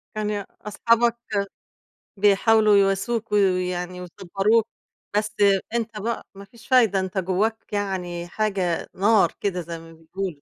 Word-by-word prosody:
كان 210 -2 -2 0.2
أصحابك 230 +2 +2 1.0
بيحاولوا 210 +1 +4
يواسوك، 200 +3 0
و - - +2
ويعني 180 -2 0
ويصبروك. 195 +5 0 0.5
بس، 210 0 0 0.4
أنتَ 225 -2 -2
بقى 230 +3 -3
ما 200 0 -11
فيش 235 +2 -18
فايدة، 230 -7 +4
أنتَ 190 +1 -4
جواك 200 +5 -1
يعني 180 -4 -3
حاجة 190 -4 -1
نار 205 +2 +3
كده 180 -3 -2
زي 165 0 -7
ما 165 0 -14
بيقولوا 165 -1 -6
200 Hz, 125 wpm, -23 LUFS, 180-215 Hz, 1.0 s, بيحاولوا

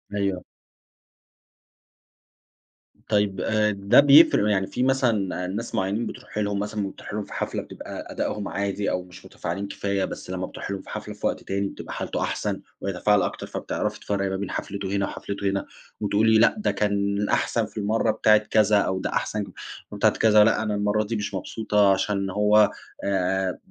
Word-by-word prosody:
أيوه. 100 -2 -1 2.7
طيّب 105 -3 +1
آآ 105 -1 +2
ده 100 +5 +4
بيف 145 +3 +8
يعني 100 -2 +2
في 125 - -2
مثلًا 115 -9 +1
ناس 105 +6 -4
معينين 100 +5 0
بتروحي 105 - -6
لهم 100 -1 -1
مثلًا 105 -1 -2
بتروحي - - -9
لهم 105 - -3
في - - -11
حفلة - - -2
بتبقى - - -8
أدائهم 105 -1 -2
عادي 100 +1 -2
أو 90 - -1
مش 90 0 -14
متفاعلين 100 +4 -4
كفاية، 100 -1 -1
بس - - -8
لمّا 95 0 -3
بتروحي 100 - -6
لهم 95 - -5
في - - -15
حفلة - - -6
في - - -2
وقت - - -3
تاني 100 0 -1
بتبقى - - -8
حالته - - -3
أحسن - - -2 0.2
ويتفاعل 100 +2 +2
أكتر، - - -3
فبتعرفي - - -3
تفرقي 100 -1 -1
ما 95 - -2
بين 100 0 -4
حفلته 100 -1 -4
هنا 100 -1 +1
وحفلته 100 0 -3
هنا 100 0 -2 0.4
وتقول 105 +2 +2
لي: 110 - +6
لأ 115 - +5
ده 210 - 0
كان 100 0 0
أحسن 115 -2 +1
في 105 +1 -14
المرّة 110 +2 +1
بتاعة 105 0 +5
كذا، 105 0 +3
أو 95 -1 +1
ده - - -2
أحسن 105 -1 -1 0.5
بتاعة - - +3
كذا، 105 -1 +5
لأ 110 0 +2
أنا 105 -1 -1
المرّة 105 +1 +1
دي 115 +2 -3
مش 105 -1 -3
مبسوطة 105 +1 +1
عشان 100 0 -1
هو 105 +1 +4 0.3
آآ 95 -1 0
100 Hz, 175 wpm, -25 LUFS, 100-105 Hz, 2.7 s, بيف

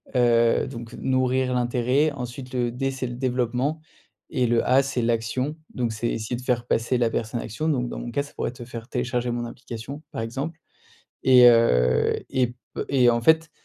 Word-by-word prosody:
heu, 120 -2 +3
donc 115 0 -8
nourrir 130 0 0
l'intérêt, 125 +4 +1
ensuite 125 -1 -7
le 120 -2 0
D 135 +3 -2
c'est 130 -1 -4
le 120 - -6
développement 125 +4 -1 0.5
et 125 -1 +1
le 115 0 +2
A 135 +2 +5
c'est 130 -2 -2
l'action. 120 +5 -1 0.2
Donc 120 -2 -1
c'est 110 +2 -2
essayer 115 +2 -3
de 120 - -6
faire 125 -1 0
passer 120 +2 +1
la 120 -2 +2
personne 115 +1 -2
à - - -5
l'action, 120 +8 -4
donc 125 -5 0
dans - - -5
mon 120 - -6
cas, 140 +3 0
ça 145 - -14
pourrait - - -3
te 125 -1 -10
faire 115 -1 -8
télécharger 125 -1 -2
mon 120 0 -2
application 120 +3 -8
par - - -4
exemple 135 +8 -4 0.6
et, 125 -2 +8
heu, 65 - +4 0.2
et 130 -1 +2
p 120 - -11 0.3
et 125 -3 +4
en 115 - +1
fait, 160 +5 +3
125 Hz, 200 wpm, -24 LUFS, 115-130 Hz, 0.6 s, et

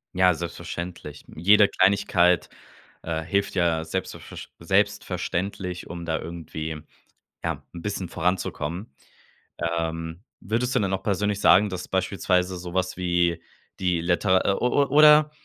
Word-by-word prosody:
Ja, 90 -1 +5
selbstverständlich. 85 -1 -7
Jede 100 +5 +5
Kleinigkeit, 95 -3 +3 0.5
äh, 80 -1 -3
hilft 100 +4 -1
ja 85 -3 +1
selbstv - - -4
versch - - -10
selbstverständlich, 95 -1 -1
um 85 0 -6
da 80 -1 -1
irgendwie, 80 -2 -6 0.6
ja, - - -3
'n 85 - -8
bisschen 95 -3 -3
voranzukommen. 85 -2 -2 0.8
Ähm, 80 +2 -4 0.2
würdest 120 +5 -1
du - - +4
denn 100 -3 0
auch 95 0 -2
persönlich 105 0 0
sagen, 105 +2 +6
dass 90 -1 -6
beispielsweise 95 -1 0
so 90 0 -8
was 95 0 -1
wie 85 -2 +1 0.4
die 90 -3 +1
Liter 95 +2 +2
o 125 - +3
o 140 +3 +2
oder 150 0 +7
90 Hz, 130 wpm, -25 LUFS, 85-100 Hz, 0.8 s, oder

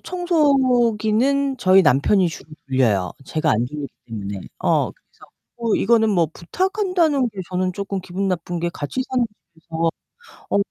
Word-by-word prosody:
청소기는 270 -6 +2
저희 190 -4 +5
남편이 175 +7 +3
주로 155 0 -10 0.2
돌려요. 115 -9 +1
제가 155 +3 0
안 115 +3 +2
돌리기 145 +2 -6 0.2
때문에. 100 -3 -5 0.2
어. - - +1
그래서 - - -21 0.3
뭐 230 -2 0
이거는 220 0 +3
뭐 175 -5 +3
부탁한다는 350 - 0
게 210 - -13
저는 185 0 -1
쪼끔 195 +1 -4
기분 185 +2 -3
나쁜 175 -1 -2
게 175 +1 -1
같이 150 - -4
사는 255 -2 +1 0.3
집에서 165 0 -2 0.6
어 - - +2
195 Hz, 310 characters per minute, -21 LUFS, 160-260 Hz, 0.6 s, 저희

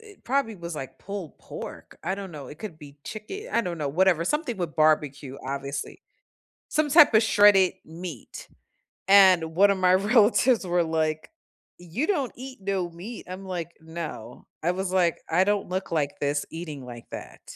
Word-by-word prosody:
it 425 -3 -16
probably 260 -3 0
was, 170 -3 -7
like, 135 -3 -7
pulled 195 -6 -7
pork, - - -9
I 190 - 0
don't 195 -1 -7
know, 150 -4 -9
it 150 - -11
could 175 -8 -7
be 145 -2 -13
chicken, 310 - -7
I 235 - +2
don't 170 -4 -4
know 145 - -1
whatever 175 +2 +3
something 290 - -1
with 170 -4 -4
barbecue, 145 -3 +1
obviously. 140 +1 -5 0.7
Some 305 -1 +1
type 295 -4 +7
of 215 - +7
shredded 205 -3 +6
meat, 165 -5 -9 0.6
and 185 -5 +6
one 200 +3 +6
of 200 - +2
my 185 -1 +4
relatives 220 +3 +4
were 175 -1 +2
like, 155 -1 -1 0.5
"You 175 - -3
don't 290 - 0
eat 255 -1 -9
no 190 -2 -1
meat," 195 +8 -9
I'm 185 +1 -7
like, 175 -2 -4
"No." 160 0 -7 0.2
I 175 - +2
was 190 0 -3
like, 175 -3 +3
"I 175 +3 +4
don't 205 0 0
look 185 +1 -3
like 150 -3 -1
this 145 0 0
eating 155 -5 -7
like 120 -1 -10
that." - - -9
180 Hz, 180 wpm, -26 LUFS, 155-205 Hz, 0.7 s, type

